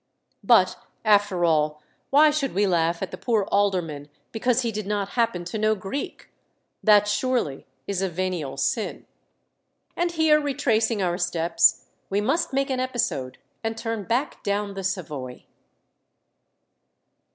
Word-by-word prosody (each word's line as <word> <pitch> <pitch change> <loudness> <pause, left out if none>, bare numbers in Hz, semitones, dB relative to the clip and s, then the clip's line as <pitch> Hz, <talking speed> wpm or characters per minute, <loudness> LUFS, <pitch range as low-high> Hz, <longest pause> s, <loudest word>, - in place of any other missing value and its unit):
But, - - +4 0.3
after 205 -4 +3
all, 150 -2 +1 0.3
why 300 +2 +6
should 285 -6 -2
we 205 +1 +3
laugh 170 -1 +1
at 190 - -5
the - - -8
poor 225 -4 +1
alderman 175 -8 0 0.2
because 245 +2 +1
he 230 - -1
did 215 -2 -5
not 205 -1 -1
happen 200 -7 0
to 195 +5 -4
know 215 0 +2
Greek? 200 +8 -6 0.5
That 210 -1 +5
surely 220 - -1 0.2
is 195 -2 -2
a 190 - 0
venial 170 -6 -3
sin. 215 - -2 0.9
And 345 0 0
here, 315 -2 +4
retracing 230 -7 +1
our 175 0 -1
steps, 170 -1 +2 0.2
we 200 - +1
must 270 +11 0
make 275 0 0
an 260 - -1
episode 220 - -2 0.3
and 225 0 -2
turn 225 -3 -4
back 245 +5 -1
down 200 0 -2
the 195 0 -6
Savoy. 150 -10 -4
205 Hz, 140 wpm, -24 LUFS, 175-235 Hz, 0.9 s, why